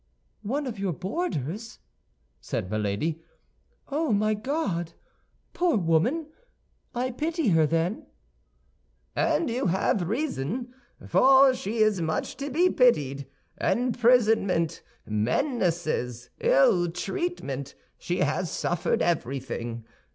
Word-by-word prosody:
"One 275 +8 -2
of 230 -6 -5
your 195 -3 -1
boarders?" 190 - -4 0.6
said 90 - -4
Milady; 110 +10 -1 0.7
"oh, 300 0 0
my 215 +1 +2
God! 210 - -2 0.6
Poor 350 -6 +2
woman! 185 - +1 0.7
I 255 +2 -1
pity 315 +1 -1
her, 160 -3 +4
then." 165 +6 -1 1.1
"And - - +1
you 235 -3 -1
have 180 0 +1
reason, 245 - -2 0.3
for 265 0 +6
she 220 -2 0
is 210 -4 +2
much 160 -1 -2
to 280 +1 -4
be 335 +7 +3
pitied. 140 - +2 0.3
Imprisonment, 225 -8 +2 0.2
menaces, 125 - -1
ill 175 +6 +4
treatment—she 175 - -4
has 155 +4 0
suffered 175 +1 0
everything. 125 -6 -2
195 Hz, 100 wpm, -26 LUFS, 155-255 Hz, 1.1 s, for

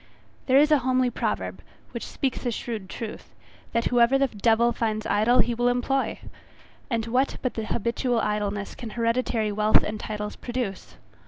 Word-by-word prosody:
There 260 0 +5
is 300 +2 +5
a 300 - +6
homely 255 -1 +1
proverb, - - -3 0.3
which - - -5
speaks 265 -3 -2
a - - +2
shrewd 220 -4 -5
truth, 225 -3 -7 0.4
that 230 0 0
whoever 245 +2 +4
the 275 - +3
devil 230 +2 +3
finds 220 -2 -2
idle 220 +4 +3
he 240 - -1
will 240 +1 +1
employ. 250 +2 0 0.7
And 230 -3 0
what 250 +4 +1
but 255 - -1
habitual 235 +2 -1
idleness 205 -1 -2
can 235 - -7
hereditary 230 -1 0
wealth 215 +1 +4
and 210 0 -4
titles 210 -1 -4
produce? 240 -6 -4
235 Hz, 160 wpm, -25 LUFS, 215-250 Hz, 0.7 s, a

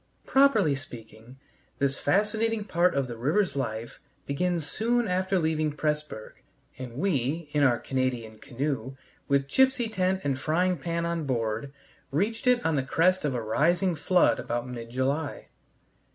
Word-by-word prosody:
Properly 265 - +4
speaking, 120 -2 -10 0.4
this 140 -1 0
fascinating 215 +5 +1
part 180 -3 +2
of 140 -1 +1
the 120 -2 -6
river's 155 - +1
life 115 -4 -4 0.3
begins 170 +3 -1
soon 235 +9 0
after 185 +1 0
leaving 155 -2 0
Pressburg, 150 -7 -4 0.4
and 125 -2 -7
we, 150 -2 -1
in 150 - +2
our 130 -4 +4
Canadian 125 -5 -2
canoe, 135 -1 -3 0.3
with 140 -1 +2
gipsy 260 - +3
tent 185 -2 0
and 135 -2 -1
frying 175 +4 +1
pan 170 +3 -2
on 170 -2 -2
board, 115 +1 -2 0.4
reached 205 - -1
it 250 -1 +3
on 160 -2 +2
the - - +2
crest 180 +8 +2
of 145 -4 -1
a 120 - -2
rising 170 - +2
flood 175 +3 +3
about 120 +1 -3
mid 120 -2 -7
July. 135 +5 -2
150 Hz, 150 wpm, -27 LUFS, 130-185 Hz, 0.4 s, Properly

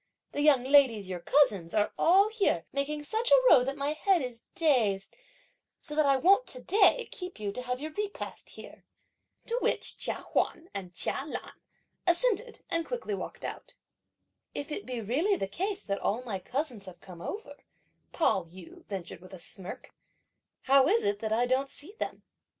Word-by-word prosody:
The 290 - -2
young 290 -4 +5
ladies, 255 -8 +4
your 180 -1 -4
cousins, 205 - +2
are 210 -1 +2
all 390 +5 +5
here 405 - +1
making 295 +2 -2
such 445 +9 -1
a - - +9
row 250 - +7
that 270 +2 -3
my 285 +1 -1
head 355 +1 +2
is 240 -2 -7
dazed, 235 - +1 0.6
so 300 - -6
that 300 -1 +3
I 275 - +5
won't 395 - +4
to - - -6
day 440 +4 +4
keep 360 - -7
you 205 -1 -2
to 250 - -6
have 250 0 -3
your 310 +2 -5
repast 410 +4 -5
here." - - -12 0.6
To 475 +1 -1
which - - -1
Chia - - +1
Huan 335 +2 -2
and 180 -3 -6
Chia 265 - -1
Lan - - -6 0.5
assented 465 +6 +1
and 335 0 0
quickly 475 +1 -4
walked - - -6
out. - - -7 0.8
"If 285 - -4
it 405 - -4
be 250 -2 -3
really 300 - +1
the 195 - -2
case 385 - -3
that 200 -1 -2
all 230 +5 0
my 210 -6 -4
cousins 245 - -4
have 180 -1 -11
come 180 -3 -12
over," 420 - -6 0.5
Pao 190 - +2
yü 175 +1 -13
ventured 185 -4 -6
with 185 +1 -11
a - - -9
smirk, 180 +2 -7 0.7
"how 270 0 +5
is 450 +6 +3
it 410 0 0
that 220 - -3
I 235 +3 +3
don't 260 +2 +1
see 320 +9 -11
them?" - - -4
280 Hz, 185 wpm, -29 LUFS, -, 0.8 s, a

